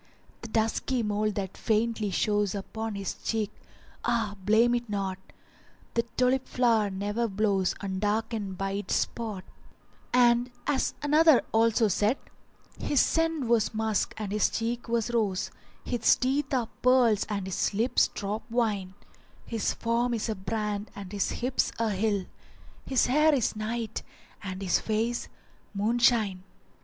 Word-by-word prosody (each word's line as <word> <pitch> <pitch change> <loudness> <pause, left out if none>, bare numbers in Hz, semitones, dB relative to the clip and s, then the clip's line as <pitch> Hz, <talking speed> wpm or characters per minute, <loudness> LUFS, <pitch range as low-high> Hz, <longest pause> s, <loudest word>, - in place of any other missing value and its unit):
The 230 - -6
dusky 225 +2 0
mole 210 0 0
that 195 -2 -4
faintly 220 -1 0
shows 205 +1 +1
Upon 220 +2 -4
his 195 -2 -3
cheek, 215 -2 -2 0.5
ah! 220 -4 0
blame 220 +4 +4
it 240 -1 -2
not: 195 -2 -2 0.7
The 235 - +3 0.2
tulip 255 +1 +2
flower 230 -4 +2
never 205 +4 -1
blows 195 -2 +1
Undarkened 205 0 -2
by 195 +1 -2
its 200 +1 -2
spot 215 -5 -2 0.7
[FN#383] - - +5
And 240 0 +4
as 285 -3 0
another 300 -1 +5
also 225 0 +3
said:— 210 +6 +1 0.6
His 285 - +1
scent 325 -4 +2
was 230 -2 +2
musk 220 -1 0
and 210 -3 -4
his 210 0 +2
cheek 235 +1 -3
was 235 0 0
rose; 210 -6 0 0.2
* - - -30
His 240 -2 +3
teeth 270 +2 0
are 245 -4 0
pearls 245 -5 +4
and 200 -3 -2
his 190 - 0
lips 230 +5 +2
drop 205 +2 -4
wine; 210 -6 -1 0.5
His 225 -3 -1
form 235 +1 0
is 225 - -2
a - - +1
brand 210 +1 -3
and 195 -2 -8
his 205 -1 0
hips 255 +2 0
a 225 -1 0
hill; 200 -1 0 0.3
* - - -25
His 265 -2 +3
hair 300 +3 +4
is 240 -4 0
night 220 +1 -3 0.4
and 190 -1 -5
his 180 - +2
face 225 +2 -1 0.5
moon 220 +4 +1
shine. 215 -6 +3
220 Hz, 150 wpm, -28 LUFS, 205-240 Hz, 0.7 s, FN#383